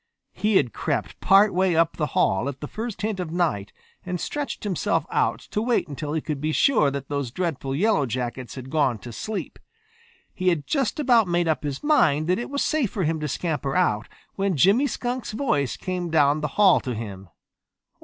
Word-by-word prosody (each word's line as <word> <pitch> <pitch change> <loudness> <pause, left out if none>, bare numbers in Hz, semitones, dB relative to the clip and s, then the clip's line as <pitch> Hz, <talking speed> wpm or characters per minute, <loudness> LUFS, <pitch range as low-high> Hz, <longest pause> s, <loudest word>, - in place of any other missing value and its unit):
He 215 0 0
had 120 - +3
crept - - -3
part 200 +2 +5
way 185 -1 +2
up 165 0 +2
the 150 - -1
hall 95 +8 +2
at 140 - -7
the 150 - -6
first 220 +2 -6
hint 215 -3 -1
of 180 -3 -3
night 160 - -1 0.3
and 180 -1 -3
stretched 290 - -4
himself 195 -5 0
out - - +1
to 210 - 0
wait 235 -5 +1
until 150 0 -5
he 160 - 0
could 150 -3 -4
be 155 +1 0
sure 185 - +3
that 140 -1 -5
those 140 -3 -2
dreadful 140 -2 -3
Yellow 190 -4 +2
Jackets 120 +1 -4
had 130 0 -8
gone 140 -7 +2
to 120 +2 -10
sleep. 215 - -5 0.7
He 185 -2 -3
had 165 -5 +2
just 275 -1 -1
about 240 -7 +4
made 175 -1 +1
up 160 - +1
his 145 -2 -4
mind 155 - +3
that 185 - +2
it 240 - -5
was 280 0 -1
safe 300 -8 +1
for 190 - -2
him 160 0 0
to 150 - -2
scamper 145 -1 -2
out 115 -13 +1 0.3
when 195 -4 -1
Jimmy 205 - +4
Skunk's 245 -4 -3
voice 150 - 0
came 180 -2 -3
down 150 -1 +3
the 150 - 0
hall 200 -3 +6
to 125 -3 -4
him. 100 -4 -7
165 Hz, 205 wpm, -24 LUFS, 140-205 Hz, 0.7 s, hall